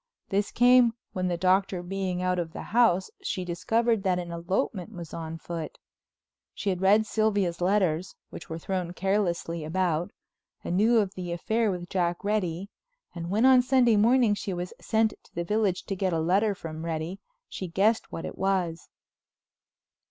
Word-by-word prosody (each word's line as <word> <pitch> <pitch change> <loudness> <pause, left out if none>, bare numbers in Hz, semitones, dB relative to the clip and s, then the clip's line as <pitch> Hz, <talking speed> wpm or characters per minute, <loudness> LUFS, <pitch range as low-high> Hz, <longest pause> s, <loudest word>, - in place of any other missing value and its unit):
This 200 0 0
came, 245 -1 +5 0.2
when 185 -1 -1
the 175 -1 -1
Doctor, 185 0 +2
being 185 -1 -2
out 180 0 +1
of 165 -1 -4
the - - -6
house, 225 -6 +3
she 185 -3 -3
discovered 220 +6 +1
that 185 -2 +1
an 175 -1 -5
elopement 175 +1 -2
was 170 -3 -9
on 165 0 -5
foot. 165 -1 -6 0.8
She 200 - -1
had 180 -1 -3
read 205 +3 +5
Sylvia's 205 -5 0
letters, 185 -2 +1 0.2
which - - -9
were 160 - -4
thrown 180 0 -3
carelessly 180 -4 -1
about, 170 0 0 0.5
and 175 - -2
knew 225 +5 +4
of 200 -3 +1
the 180 -3 -5
affair 220 +6 0
with 180 -2 -4
Jack 175 -1 -1
Reddy, 200 -2 -1 0.4
and 170 -1 -6
when 215 +6 +2
on 260 -1 +7
Sunday 250 -3 +4
morning 230 +1 +4
she 200 -2 -3
was 175 +1 -5
sent 220 -1 +1
to - - -25
the 170 - -1
village 205 0 0
to 195 - -4
get 185 -1 -1
a 165 - +1
letter 195 +6 +2
from 160 -2 -7
Reddy 165 +3 -3 0.3
she 185 - -6
guessed 205 +6 +1
what 165 - -5
it - - -7
was. 185 -4 -1
185 Hz, 175 wpm, -27 LUFS, 170-210 Hz, 0.8 s, on